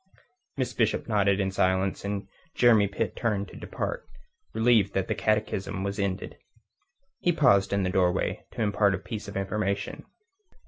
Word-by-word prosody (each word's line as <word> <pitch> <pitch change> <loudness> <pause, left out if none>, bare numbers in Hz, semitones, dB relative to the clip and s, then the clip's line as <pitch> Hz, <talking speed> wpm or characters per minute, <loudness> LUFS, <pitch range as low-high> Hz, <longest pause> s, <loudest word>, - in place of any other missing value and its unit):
Miss 130 -2 -1
Bishop 110 -2 0
nodded 100 -3 +2
in 95 -1 0
silence, 95 0 +1
and 100 -1 -3 0.3
Jeremy 115 -4 +5
Pitt 100 0 -3
turned 100 -4 -1
to - - -13
depart, - - -4 0.5
relieved 110 -4 +3
that 95 -1 0
the - - 0
catechism 105 -2 -1
was 100 +1 -3
ended. 100 -1 -3 0.8
He 175 - +2
paused 100 - +4
in 100 -1 +1
the 90 - 0
doorway 90 -1 +1
to 115 - -1
impart 100 -1 +2
a - - -4
piece 110 -3 -7
of 100 - -5
information. 100 0 -2
100 Hz, 155 wpm, -27 LUFS, 95-110 Hz, 0.8 s, Jeremy